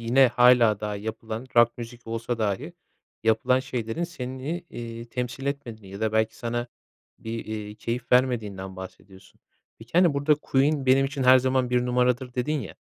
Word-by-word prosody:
yine 125 +3 +5
hâlâ 120 -3 +5
daha 105 -1 -3
yapılan 110 +3 -6
rock 120 +1 +5
müzik 120 0 -9
olsa 115 +1 -3
dahi 110 - -2 0.5
yapılan 115 +3 +3
şeylerin 120 +5 -3
seni, 140 +1 -5
eee, 115 0 -7
temsil 125 +2 -5
etmediğini 120 -8 -5
ya 100 - -8
da 110 -1 0
belki 110 0 +1
sana 120 0 -3 0.5
bir, 115 0 -5
eee, 105 -1 -6
keyif 120 +3 -4
vermediğinden 105 -7 +1
bahsediyorsun. 95 +1 -12 0.4
Peki, 110 +2 -15
hani, 175 -3 +4
burada 145 +2 +3
Queen 140 -1 +1
benim 135 +1 +5
için 140 -1 -4
her 130 0 +7
zaman 130 -1 +1
1 125 0 +2
numaradır 125 0 +1
dedin 145 +4 -1
ya, 105 - -8
120 Hz, 165 wpm, -26 LUFS, 110-130 Hz, 0.5 s, her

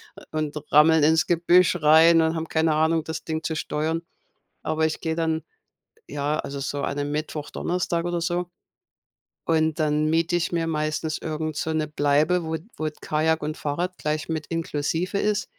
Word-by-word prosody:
äh, - - -13
und 155 -1 -2 0.2
rammeln 155 +1 +6
ins 160 +2 +4
Gebüsch 175 +1 +4
rein 160 +2 +6
und 160 +1 +1
haben 160 0 -3
keine 160 -1 +1
Ahnung, 160 +1 +2
das 160 0 -5
Ding 160 -1 -3
zu 160 - -2
steuern. 160 +2 -2 0.6
Aber 155 0 0
ich 160 - -2
gehe 160 -1 -1
dann, 160 -1 -1 0.7
ja, 145 +1 -1
also 140 0 -5
so 140 +1 -3
an 140 - -2
'nem 145 0 -2
Mittwoch, 150 0 -4
Donnerstag 175 -1 -1
oder 175 -1 -1
so 175 +1 -1 1.0
und 160 -1 +1
dann 155 0 +1
miete 165 +2 +1
ich 175 - -1
mir 165 -1 0
meistens 155 0 -2
irgend 155 -1 -4
so 160 +2 -2
'ne 155 -1 -1
Bleibe, 150 +4 +2
wo 160 0 -2 0.2
wo 155 0 -2
Kajak 160 +1 0
und 155 +1 -3
Fahrrad 175 +5 -3
gleich 155 0 -2
mit 160 -2 -3
inklusive 165 +3 -2
ist. 210 0 0
160 Hz, 175 wpm, -24 LUFS, 155-165 Hz, 1.0 s, rammeln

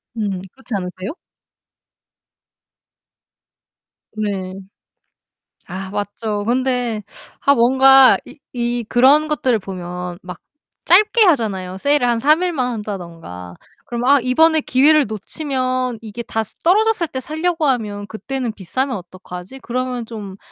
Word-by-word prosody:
음. 200 -4 -2
그렇지 260 -3 -10
않으세요? 185 - -5 3.0
네. 200 -3 -3 1.1
아 190 +1 -6
맞죠. 205 +1 -3
근데 245 -2 0 0.4
아 280 - +5
뭔가 265 +1 +6
이 295 - -14
이 240 -1 -1
그런 275 +5 +5
것들을 260 -6 +1
보면 180 -2 -6
막 180 -2 -8 0.5
짧게 425 +6 +5
하잖아요 200 - 0
세일을 285 +3 +2
한 235 -1 +2
3일만 305 -2 +2
한다든가. 170 - -7 0.3
그럼 240 0 -3
'아 280 +1 +6
이번에 315 +6 +4
기회를 290 +3 +4
놓치면 255 - -2
이게 225 +1 -7
다 225 -1 -2
스 215 - -16
떨어졌을 410 0 +3
때 260 - -5
살려고 320 +3 -1
하면 210 -6 -1
그때는 245 +2 -4
비싸면 255 +8 -2
어떡하지? 180 +5 -10
그러면 250 -1 -3
좀 210 -4 -8
240 Hz, 245 characters per minute, -19 LUFS, 200-270 Hz, 3.0 s, 뭔가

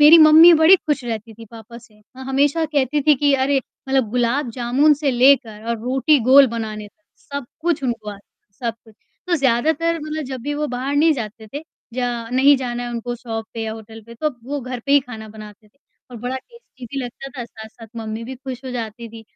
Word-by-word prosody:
मेरी 300 +3 +9
मम्मी 315 +2 +9
बड़ी 355 +4 +8
खुश 295 -6 -2
रहती 225 -1 -5
थी 225 +1 -12
पापा 230 0 -11
से, 215 -3 -21 0.2
माँ 265 - -9
हमेशा 285 +4 +1
कहती 285 +1 +1
थी 300 +1 +5
कि 285 +1 +2
अरे 270 +1 +2 0.3
मतलब 265 -4 +1
गुलाब 245 +3 0
जामुन 255 +6 +2
से 285 -1 -1
लेकर 245 -4 +3
और 235 -1 -1
रोटी 265 +5 +2
गोल 275 0 +8
बनाने 220 -3 -5
तक, 260 - -42 0.2
सब 280 -2 -7 0.2
कुछ 330 -2 0
उनको 225 -4 -3
आता 205 - -8 0.3
है, - - -51 0.2
सब - - -15
कुछ, 220 -2 -19 0.3
तो 355 - +1
ज़्यादातर 315 +5 +1
मतलब 310 +1 -4
जब 260 -1 -6
भी 290 +3 -3
वो 300 +1 -2
बाहर 255 +3 -3
नहीं 315 +2 +5
जाते 220 -4 -6
थे, 290 - -4 0.3
या 240 -2 -3
नहीं 270 +3 +5
जाना 245 -2 -4
है 245 - -4
उनको 240 +1 -4
शॉप 225 -2 -5
पे 225 - -4
या 220 0 -3
होटल 220 0 -11
पे, 235 - -12
तो 305 +6 -1
वो 285 +2 -4
घर 255 -1 -6
पे 280 - +2
ही 285 - +6
खाना 225 -4 -10
बनाते 215 0 -13
थे 245 - -40 0.3
और 245 - -9
बड़ा 245 +3 -4
टेस्टी 285 - -14
भी 275 +4 -6
लगता 245 +3 -8
था, 240 - -3
साथ-साथ 220 0 -13
मम्मी 220 0 -5
भी 260 +3 -7
खुश 260 0 -8
हो 260 - -5
जाती 230 -1 -6
थी। 225 0 -12
250 Hz, 225 wpm, -20 LUFS, 230-285 Hz, 0.3 s, मेरी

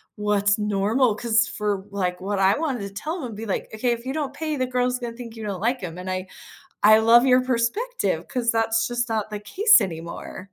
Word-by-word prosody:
what's 205 0 +1
normal 210 +3 +1
'cause 230 +1 +2
for, 205 -4 -3
like 180 -3 -2
what 200 0 -2
I 195 +4 +4
wanted 270 -9 -2
to 200 - -5
tell 310 - -4
'em 225 -4 -7
be, 225 +2 -6
like, 195 - -3
"Okay, 240 +3 0
if 235 0 -3
you 265 - -3
don't 290 -3 -3
pay 310 +1 -3
the 255 - 0
girls 250 0 0
gonna 235 -1 -6
think 235 -2 -9
you 220 - -8
don't 195 -3 -4
like 240 0 0
'em." 165 -1 -6
And 185 +1 -6
I 185 0 -3 0.6
I 215 +1 +8
love 235 +3 +6
your 255 0 +5
perspective 260 - -1
'cause 245 -3 0
that's 225 0 +1
just 240 0 -2
not 215 -1 -2
the 210 -1 -5
case 420 - +5
anymore. 170 -1 -6
225 Hz, 220 wpm, -23 LUFS, 205-250 Hz, 0.6 s, I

